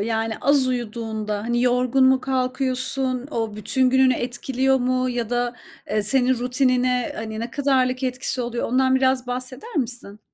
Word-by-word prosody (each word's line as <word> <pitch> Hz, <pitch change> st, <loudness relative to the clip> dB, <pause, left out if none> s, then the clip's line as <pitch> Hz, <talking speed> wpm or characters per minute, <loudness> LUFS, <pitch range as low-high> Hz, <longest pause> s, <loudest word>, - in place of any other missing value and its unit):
Yani, 225 Hz, +1 st, -1 dB
az 280 Hz, -2 st, +4 dB
uyuduğunda, 220 Hz, -3 st, -3 dB
hani, 240 Hz, +2 st, 0 dB
yorgun 250 Hz, +1 st, +2 dB
mu 260 Hz, 0 st, +4 dB
kalkıyorsun? 255 Hz, 0 st, -1 dB
O 225 Hz, -5 st, -3 dB
bütün 255 Hz, +5 st, +2 dB
gününü 260 Hz, 0 st, +4 dB
etkiliyor 260 Hz, +2 st, 0 dB
mu 255 Hz, 0 st, 0 dB
ya 240 Hz, -2 st, -3 dB
da, 245 Hz, 0 st, -1 dB, 0.3 s
eee, 210 Hz, 0 st, +1 dB
senin 255 Hz, +4 st, +3 dB
rutinine, 250 Hz, 0 st, +1 dB
hani, 220 Hz, 0 st, -5 dB
ne 235 Hz, +1 st, -4 dB
kadarlık 260 Hz, -2 st, +1 dB
etkisi 255 Hz, 0 st, -1 dB
oluyor? 240 Hz, 0 st, -3 dB
Ondan 260 Hz, +2 st, +2 dB
biraz 260 Hz, -1 st, +2 dB
bahseder 255 Hz, -, -5 dB
misin? 240 Hz, -6 st, -2 dB
250 Hz, 150 wpm, -22 LUFS, 235-260 Hz, 0.3 s, az